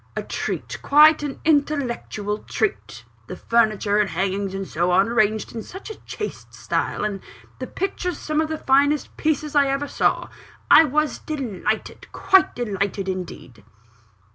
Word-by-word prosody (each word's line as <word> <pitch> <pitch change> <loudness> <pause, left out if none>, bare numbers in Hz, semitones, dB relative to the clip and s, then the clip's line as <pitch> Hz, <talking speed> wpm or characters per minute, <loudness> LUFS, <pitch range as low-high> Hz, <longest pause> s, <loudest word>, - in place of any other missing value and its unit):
A - - -3
treat; - - -4
quite 305 +2 +6
an 290 -2 -5
intellectual 265 -8 0
treat 430 - -3 0.2
the - - -6
furniture 215 -3 +1
and 210 -2 +2
hangings, 195 +2 -2
and 195 -1 -4
so 175 +3 -1
on, 190 +3 +4
arranged 215 -2 +1
in 225 - -5
such 380 - -9
a - - -7
chaste 420 - -7
style - - -2
and 200 -2 -3 0.4
the - - -5
pictures, 360 -2 -3
some 305 0 -1
of 315 - -2
the 315 - -3
finest 285 +1 +2
pieces 305 -1 -1
I 285 -1 +5
ever 275 +1 -1
saw - - 0 0.4
I 320 - +9
was 305 +2 0
delighted 235 - -4
quite 385 -1 +3
delighted, 200 -4 -2
indeed." 175 - -6
245 Hz, 150 wpm, -22 LUFS, 200-305 Hz, 0.4 s, I